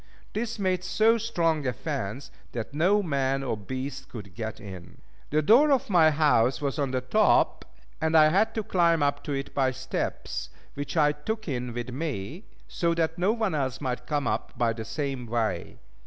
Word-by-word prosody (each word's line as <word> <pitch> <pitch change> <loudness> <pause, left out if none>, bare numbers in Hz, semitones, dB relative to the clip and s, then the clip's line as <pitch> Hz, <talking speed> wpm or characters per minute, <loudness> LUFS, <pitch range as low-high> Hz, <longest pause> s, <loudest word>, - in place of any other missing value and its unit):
This 225 +1 -3
made 185 -3 0
so 225 +4 +3
strong 165 - 0
a 125 - 0
fence 135 -2 -4 0.2
that 120 +3 -5
no 190 +7 +3
man 135 -4 0
or 125 - -1
beast 130 +6 -6
could 100 -6 -9
get 110 +3 -5
in. 95 -4 -10 0.3
The 155 +1 +1
door 270 - +6
of 260 -6 +1
my 165 -4 +6
house 145 -5 +3
was 140 +1 -2
on 140 -2 +1
the 130 0 -1
top, 215 +12 +3 0.4
and 160 0 +3
I 155 0 +7
had 210 +6 +2
to 220 - -1
climb 170 -5 +3
up 145 0 0
to - - -4
it 135 0 -4
by 135 -2 +2
steps, 130 0 -4 0.2
which 145 +3 -5
I 150 -1 +5
took 215 +9 -5
in 125 -4 -3
with 120 +1 -5
me, 145 - -4 0.2
so 170 -2 0
that 165 0 -1
no 185 +4 +3
one 220 -5 -1
else 135 -4 -1
might 125 -3 -4
come 145 -2 0
up 110 - -2
by 115 -1 +2
the 110 0 -6
same 130 +1 -3
way. 110 -6 -2
145 Hz, 190 wpm, -27 LUFS, 125-175 Hz, 0.4 s, I